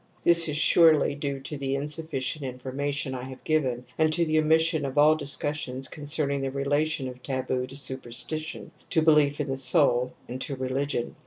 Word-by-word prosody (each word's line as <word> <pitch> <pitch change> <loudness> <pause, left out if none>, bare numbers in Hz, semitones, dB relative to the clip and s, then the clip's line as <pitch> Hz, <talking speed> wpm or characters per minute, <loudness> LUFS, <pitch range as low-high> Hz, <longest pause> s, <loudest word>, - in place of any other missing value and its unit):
This 170 -1 +5
is 150 - -1
surely 160 -2 +5
due 140 -1 -4
to 145 +2 -6
the 135 0 -1
insufficient 150 -1 -3
in 130 -1 -5
formation 135 +1 -3
I 125 - -5
have 130 0 -10
given 130 -6 0
and 155 0 +3
to 170 +1 +1
the 155 0 +2
omission 160 0 +2
of 135 0 -4
all 150 +1 +6
discussions 145 -3 -2
concerning 145 -2 -1
the 135 - -2
relation 145 +2 -1
of 125 0 -9
taboo 130 -1 -2
to 135 - -11
superstition, 135 +3 -4 0.2
to 160 - +2
belief 150 -2 +4
in 150 - -2
the 135 0 -2
soul, 125 -2 +3
and 125 +2 -6
to 140 - -4
re 130 0 -4
ligion. 135 -2 -2
140 Hz, 185 wpm, -26 LUFS, 130-155 Hz, 0.2 s, all